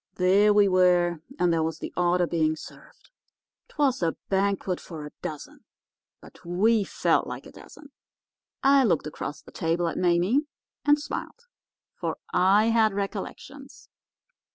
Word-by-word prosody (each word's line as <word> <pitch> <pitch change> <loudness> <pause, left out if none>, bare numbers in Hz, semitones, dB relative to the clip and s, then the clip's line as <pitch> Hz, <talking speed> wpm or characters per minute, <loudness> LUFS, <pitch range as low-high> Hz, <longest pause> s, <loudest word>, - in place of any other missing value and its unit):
"There 195 +3 +4
we 205 -1 +5
were, 180 -2 +3 0.2
and 175 -1 +2
there 165 - +1
was 160 0 -2
the - - -7
order 180 0 +2
being 160 -2 0
served. 155 - -14 0.6
'Twas 275 -6 0
a 165 -1 0
banquet 195 -1 0
for 160 -4 -9
a 150 - -9
dozen, 155 -5 -8 0.6
but - - -17
we 205 +6 +2
felt - - 0
like - - -7
a - - -12
dozen. 290 -1 -15 0.7
I 275 0 +5
looked 175 - +1
across 150 -1 -6
the - - -15
table 170 +1 -1
at - - -3
Mame 180 - +2 0.4
and 290 0 +5
smiled, 460 +10 -7 0.5
for - - -4 0.2
I 200 +5 +4
had 220 -2 +3
recollections. 200 -1 -7
180 Hz, 145 wpm, -26 LUFS, 170-215 Hz, 0.7 s, we